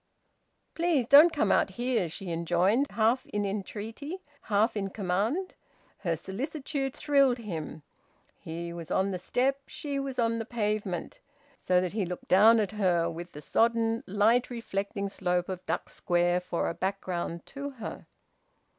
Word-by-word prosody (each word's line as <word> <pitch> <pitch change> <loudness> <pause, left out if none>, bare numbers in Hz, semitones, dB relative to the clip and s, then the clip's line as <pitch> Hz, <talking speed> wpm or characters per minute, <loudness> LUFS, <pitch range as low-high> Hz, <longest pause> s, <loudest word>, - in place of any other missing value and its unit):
"Please 330 -7 +1
don't 295 +7 +8
come 250 -11 +1
out - - +3
here," 235 -3 -1
she 175 +2 -6
enjoined, 175 - +2
half 230 +5 +1
in 205 0 -2
entreaty, 215 - -5 0.2
half 215 +3 +1
in 195 -2 -2
command. 210 - -1 0.5
Her 170 -4 0
solicitude 270 - -4
thrilled 275 -4 +3
him. 165 -9 -6 0.6
He 170 +1 -6
was 170 -2 -7
on 190 +1 +1
the 185 - -3
step, 265 +8 0
she 285 -2 -4
was 275 -1 -4
on 230 -1 +1
the 225 - -3
pavement: 210 -5 -2 0.4
so 180 -7 +2
that 180 0 -2
he 215 -2 0
looked 180 0 -7
down 220 +5 +7
at 210 -1 0
her, 180 -5 +1
with 170 +2 -8
the 150 - -8
sodden, 230 +6 +1
light 215 +5 +3
reflecting 200 -4 -3
slope 180 -2 -1
of 185 -1 -5
Duck - - -1
Square 175 0 +1
for 180 -1 -2
a - - -1
background 180 -3 -3
to 280 +1 -6
her. 245 -6 -8
205 Hz, 155 wpm, -29 LUFS, 180-245 Hz, 0.6 s, don't